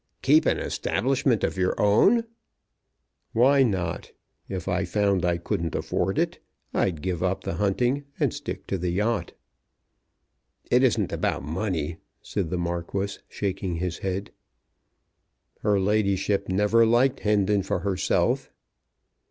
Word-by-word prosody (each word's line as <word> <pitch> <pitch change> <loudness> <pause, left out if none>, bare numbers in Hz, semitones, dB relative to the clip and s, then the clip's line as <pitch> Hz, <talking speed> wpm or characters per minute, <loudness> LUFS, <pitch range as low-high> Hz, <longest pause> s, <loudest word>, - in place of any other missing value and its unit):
"Keep - - +5
an - - +2
establishment 130 -3 0
of 95 - -1
your 90 0 0
own?" 155 - +4 1.1
"Why 135 +4 +5
not? 95 -9 -1 0.4
If 95 -3 -5
I 90 0 0
found 100 0 +1
I 85 -1 +2
couldn't 85 -1 -3
afford - - -1
it - - 0 0.3
I'd 80 -6 0
give 90 -3 -2
up 95 +1 -1
the - - -3
hunting 125 +8 +1
and - - +1
stick - - -6
to 95 - -2
the 90 +1 -1
yacht." 105 +5 -1 1.4
"It - - +5
isn't - - +2
about - - -1
money," 80 0 -2 0.3
said 95 -6 -2
the 90 - -2
Marquis, 85 +3 -3
shaking 95 -3 -3
his 85 0 -3
head. 95 +1 -3 1.3
"Her 105 -2 +2
ladyship 100 -1 +1
never 105 +5 +3
liked 125 +4 +3
Hendon 105 -1 +2
for 90 -1 -2
herself." 95 0 0
95 Hz, 130 wpm, -25 LUFS, 90-105 Hz, 1.4 s, Keep